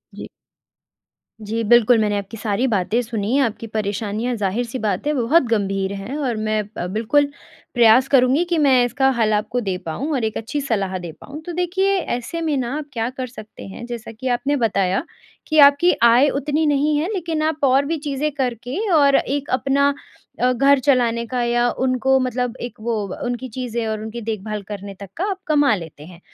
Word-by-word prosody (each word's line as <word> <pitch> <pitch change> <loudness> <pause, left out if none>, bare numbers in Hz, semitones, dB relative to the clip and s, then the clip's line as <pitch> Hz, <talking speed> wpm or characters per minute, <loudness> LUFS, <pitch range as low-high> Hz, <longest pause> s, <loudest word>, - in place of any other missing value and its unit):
जी। - - -8 1.2
जी। 225 +2 -2
बिल्कुल, 240 +1 +5
मैंने 210 -1 +1
आपकी 200 +3 -6
सारी 210 +3 -1
बातें 215 +1 +1
सुनी, 225 +1 -2
आपकी 230 -3 -1
परेशानियाँ 215 +3 -2
जाहिर 210 +3 -1
सी 240 +2 -6
बात 210 - -1
है 300 - +2
बहुत 275 +5 +3
गंभीर 195 -3 0
हैं 200 +7 -6
और 260 -6 -1
मैं 215 0 +1 0.2
अ, 175 - -3
बिल्कुल 235 +9 +1 0.4
प्रयास 240 +2 +5
करूँगी 270 +4 +4
कि 340 - +1
मैं 265 -5 +4
इसका 265 +2 +1
हल 215 -2 +2
आपको 215 +4 -1
दे 190 -4 -2
पाऊँ 270 - -3
और 255 -5 -1
एक 220 0 -2
अच्छी 280 +6 -3
सलाह 195 -8 -1
दे 170 -2 -7
पाऊँ। 295 +3 -9
तो 350 - -5
देखिए 380 +3 +1 0.2
ऐसे 330 +7 -5
में 315 -3 0
ना 255 +1 -2
आप 305 - -5
क्या 230 0 -1
कर 255 0 -5
सकते 215 -3 -12
हैं 195 +5 -8
जैसा 235 -2 -7
कि 250 +4 -7
आपने 250 +4 0
बताया, 200 -4 +1 0.4
कि 310 -1 +2
आपकी 285 +5 +7
आय 240 +5 +6
उतनी 295 +3 -1
नहीं 295 +1 +2
है 310 - 0
लेकिन 330 -5 -2
आप 315 -1 0
और 275 +1 +4
भी 325 +2 -1
चीज़ें 295 0 -2
करके 250 0 -3 0.2
और 280 -3 +5
एक 285 +1 -1
अपना 275 +2 +2 0.5
अ, 250 +1 +3
घर 275 +3 +4
चलाने 240 -4 +2
का 250 +1 -2
या 240 0 +2 0.2
उनको 260 +1 +2
मतलब 250 -1 -2
एक 240 - -6
वो 230 0 -1 0.3
उनकी 245 +1 -3
चीज़ें 235 -1 -4
और 215 -1 -2
उनकी 220 +2 -6
देखभाल 215 -1 -4
करने 200 0 -7
तक 200 -2 -9
का 365 - -1
आप 390 -1 -3
कमा 290 -6 +3
लेते 160 -5 -9
हैं। 170 0 -13
245 Hz, 195 wpm, -21 LUFS, 220-280 Hz, 1.2 s, आपकी